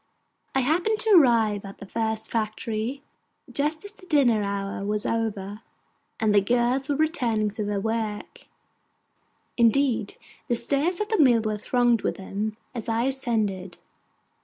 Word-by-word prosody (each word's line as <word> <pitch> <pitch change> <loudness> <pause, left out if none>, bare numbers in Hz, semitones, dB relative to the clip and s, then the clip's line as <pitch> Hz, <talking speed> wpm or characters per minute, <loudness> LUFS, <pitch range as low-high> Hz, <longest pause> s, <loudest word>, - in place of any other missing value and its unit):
I 265 - +3
happened 345 - +1
to 440 - +1
arrive 230 - +5
at 195 -1 -9
the - - -10
first 220 +1 -3
factory 225 +4 -3 0.5
just 305 +4 -1
as 405 - -6
the 410 -3 -18
dinner 255 - +3
hour 200 -1 -3
was 210 +1 -1
over, 210 -2 -2 0.6
and 220 -2 +2
the 205 - +5
girls 245 +5 +1
were 285 - +2
returning 245 -9 +1
to 215 +1 -4
their 205 -1 -1
work; 220 0 -4 1.1
indeed 235 -2 +2 0.3
the 240 - +1
stairs 295 +8 0
of 425 - -2
the 440 - +1
mill 245 -6 +5
were 215 -1 -2
thronged 240 0 +2
with - - -1
them 210 +3 -4 0.2
as 235 -2 -5
I 225 +1 +1
ascended. 215 -9 -1
230 Hz, 150 wpm, -25 LUFS, 210-270 Hz, 1.1 s, arrive